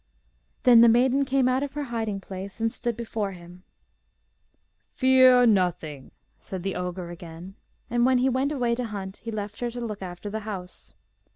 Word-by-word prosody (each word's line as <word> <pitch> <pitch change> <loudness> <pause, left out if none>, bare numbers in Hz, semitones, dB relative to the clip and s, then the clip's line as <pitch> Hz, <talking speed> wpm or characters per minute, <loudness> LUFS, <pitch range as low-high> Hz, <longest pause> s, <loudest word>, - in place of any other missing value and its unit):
Then 240 -2 +8
the 235 - +8
maiden 260 +4 +3
came 265 -1 +2
out 255 +1 +1
of 285 -1 -4
her 295 0 -3
hiding 225 -5 -3
place, 195 +2 -8
and 225 0 0
stood 240 -2 -3
before 220 -4 -3
him. 175 0 -13 1.3
'Fear 255 -1 +5
nothing,' 175 - 0 0.3
said 185 -2 -7
the 195 0 -2
ogre 180 -1 -4
again; 170 +2 -10 0.3
and 240 +1 +1
when 255 +1 +4
he 250 +1 +2
went 265 +2 0
away 245 -5 0
to 245 +1 -2
hunt 195 -3 -6
he 230 - -8
left 210 -2 -5
her 240 - -2
to 240 +1 -7
look 215 -4 -5
after 185 +2 -7
the 220 - -3
house. 195 -4 -8
220 Hz, 180 wpm, -26 LUFS, 190-250 Hz, 1.3 s, Then